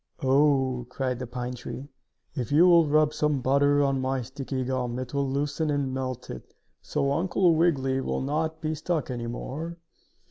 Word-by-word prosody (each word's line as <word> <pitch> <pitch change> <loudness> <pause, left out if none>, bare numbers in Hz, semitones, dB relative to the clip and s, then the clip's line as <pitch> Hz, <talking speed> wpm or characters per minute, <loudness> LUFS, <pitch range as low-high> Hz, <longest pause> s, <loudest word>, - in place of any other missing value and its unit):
"Oh!" 130 -2 +2
cried 125 -1 -2
the 125 - -5
pine 125 +1 -4
tree. 125 +2 -7 0.5
"If 130 -3 -4
you 155 +5 +6
will 170 -3 +6
rub 155 +1 +3
some 150 -2 +1
butter 145 +2 +3
on 135 -1 +1
my 130 -1 -1
sticky 130 +1 -4
gum, 125 -1 -2
it 130 0 -5
will 140 -1 0
loosen 145 +3 -1
and 140 -3 -1
melt 130 -2 -4
it, 60 - -10 0.3
so 140 - -1
Uncle 175 +3 +2
Wiggily 135 -5 +2
will - - -2
not 155 +3 -2
be 155 -1 -1
stuck 155 -2 -2
any 120 -1 -4
more." 155 +8 -5
135 Hz, 175 wpm, -27 LUFS, 130-150 Hz, 0.5 s, you